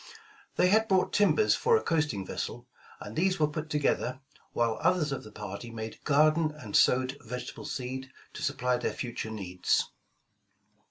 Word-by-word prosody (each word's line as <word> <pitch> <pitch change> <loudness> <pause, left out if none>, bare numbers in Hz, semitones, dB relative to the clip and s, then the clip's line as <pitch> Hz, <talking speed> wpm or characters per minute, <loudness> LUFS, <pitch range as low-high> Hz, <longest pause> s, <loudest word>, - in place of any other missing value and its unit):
They 180 - +4
had 220 +3 +4
brought 190 -2 +2
tim 205 -1 +4
bers 430 - +4
for 460 0 +3
a - - -3
coasting 150 - 0
vessel, - - -5 0.3
and 105 - -8
these 185 +2 +1
were 155 - +5
put 155 +1 -5
together, 140 -3 0 0.3
while 115 -2 0
othei^ 175 -5 +2
of 135 - -3
the 110 - -11
party 105 +2 -7
made 110 -1 -7
garden 155 +2 +4
and 105 -8 -6
sowed 130 +2 +3
vegetable 125 +2 -7
seed, 130 +1 -5 0.2
to - - -7
supply 125 -4 0
their 120 - -2
future 120 -3 -4
needs. 90 -4 0
130 Hz, 165 wpm, -29 LUFS, 115-155 Hz, 0.3 s, were